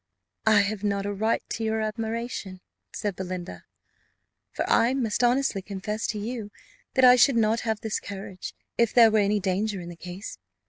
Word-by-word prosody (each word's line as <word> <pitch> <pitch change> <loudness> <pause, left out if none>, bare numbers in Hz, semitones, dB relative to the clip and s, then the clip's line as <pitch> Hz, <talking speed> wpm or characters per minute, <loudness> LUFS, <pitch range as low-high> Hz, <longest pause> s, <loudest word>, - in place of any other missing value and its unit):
"I 215 -2 +6
have 200 0 -2
not 200 -1 0
a 205 - -2
right 220 +3 0
to 225 - -3
your 220 0 0
admiration," 220 -3 -4 0.3
said 205 -4 -3
Belinda; 185 -1 -6 0.9
"for - - -3
I 245 +3 +3
must 240 -3 0
honestly 245 -4 +2
confess 205 +3 -4
to 215 - -2
you 220 0 -4 0.5
that 260 -1 +6
I 250 0 +9
should 250 +1 +5
not 225 0 +3
have 220 -3 -2
this 220 -1 -2
courage 195 -2 -8 0.2
if 235 -2 +2
there 230 -2 +8
were 215 - +3
any 205 +1 +2
danger 195 +2 -1
in 175 -1 -7
the 175 - -8
case. 180 +4 -8
215 Hz, 180 wpm, -26 LUFS, 195-230 Hz, 0.9 s, I